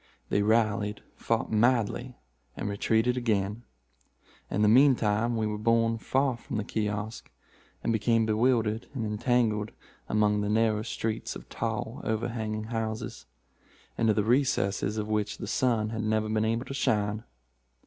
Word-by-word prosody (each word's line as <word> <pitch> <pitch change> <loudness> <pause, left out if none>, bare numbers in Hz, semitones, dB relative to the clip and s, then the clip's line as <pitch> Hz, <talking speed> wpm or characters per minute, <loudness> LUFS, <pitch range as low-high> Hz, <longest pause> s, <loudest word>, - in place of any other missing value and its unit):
They 100 - +2
rallied, 105 -1 +1
fought 115 0 -1
madly, 120 +2 +1 0.4
and - - -3
retreated 110 +4 +1
again. 105 -2 0 0.9
In 105 - 0
the - - +5
mean 130 +5 +6
time 115 +2 0
we 110 - 0
were 105 0 -2
borne 115 0 +2
far 135 +1 +1
from 115 - -5
the 105 - -1
kiosk, 105 +1 -3 0.5
and 115 - +1
became 115 +1 +2
bewildered 110 0 +1
and 115 -4 -2
entangled 110 -1 +1 0.4
among 105 -1 +2
the 105 - -1
narrow 110 0 +2
streets 110 0 -3
of - - -10
tall, - - -3
overhanging 110 -1 -2
houses, 110 - -4 0.7
into 110 -2 +2
the 105 - +2
recesses 110 -4 +1
of 105 -1 -2
which 105 -1 -1
the - - -6
sun 115 -4 +1
had 110 -1 -3
never 110 0 0
been 110 0 +1
able 115 +3 0
to - - -6
shine. 105 -4 0
110 Hz, 150 wpm, -28 LUFS, 105-115 Hz, 0.9 s, mean